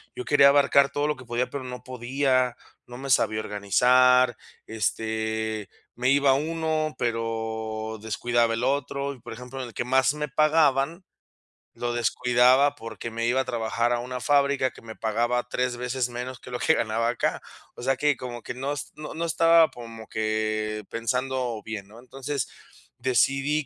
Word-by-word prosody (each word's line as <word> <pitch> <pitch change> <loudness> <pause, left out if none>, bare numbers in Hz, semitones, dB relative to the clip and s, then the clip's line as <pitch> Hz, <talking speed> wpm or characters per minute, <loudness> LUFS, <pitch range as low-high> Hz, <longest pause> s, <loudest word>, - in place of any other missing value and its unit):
yo 125 - -5
quería 140 -1 +6
abarcar 140 0 +5
todo 145 +1 0
lo 150 - 0
que 130 - -12
podía, 120 +1 -1
pero 140 -2 -5
no 125 0 -7
podía, 130 0 0 0.3
no 120 - -9
me 135 +1 -7
sabía 110 -3 +3
organizar, 125 +5 +4 0.3
este, 110 -1 -2 0.3
me 125 +2 +1
iba 140 -1 +4
a - - +6
uno, 155 +1 -1
pero 110 -1 -3
descuidaba 115 +1 +1
el 115 - -3
otro, 140 +1 -1
y, 130 - -15
por - - -10
ejemplo, 125 +3 -8
en 125 - -5
el 115 - -15
que 120 - -2
más 130 +2 +3
me 150 0 -3
pagaban, 155 +2 +2 0.7
lo 120 0 -2
descuidaba, 125 +4 +3
porque 115 -2 -7
me 115 +1 -2
iba 130 +2 +2
a - - -5
trabajar 115 -1 -1
a 120 - 0
una 125 +1 -5
fábrica 140 -2 +2
que - - -15
me 110 -1 -10
pagaba 120 +3 0
3 125 -1 -1
veces 125 0 -1
menos 125 +1 -6
que - - -12
lo 125 - -2
que 160 - +4
ganaba 115 +1 0
acá. 120 - -1 0.3
O - - -9
sea, 135 +1 +1
que 145 0 +2
como 120 -2 -7
que - - -5
no 135 +3 -3
es 145 - -6
no 150 0 -7
no 165 +1 -3
estaba 165 0 +5
como 115 -2 -10
que 110 -1 -2
pensando 125 0 -2
bien, 105 -3 -6
¿no? 110 +2 -14
Entonces, 135 +1 -4 0.5
decidí 135 +4 +1
125 Hz, 180 wpm, -26 LUFS, 115-140 Hz, 0.7 s, quería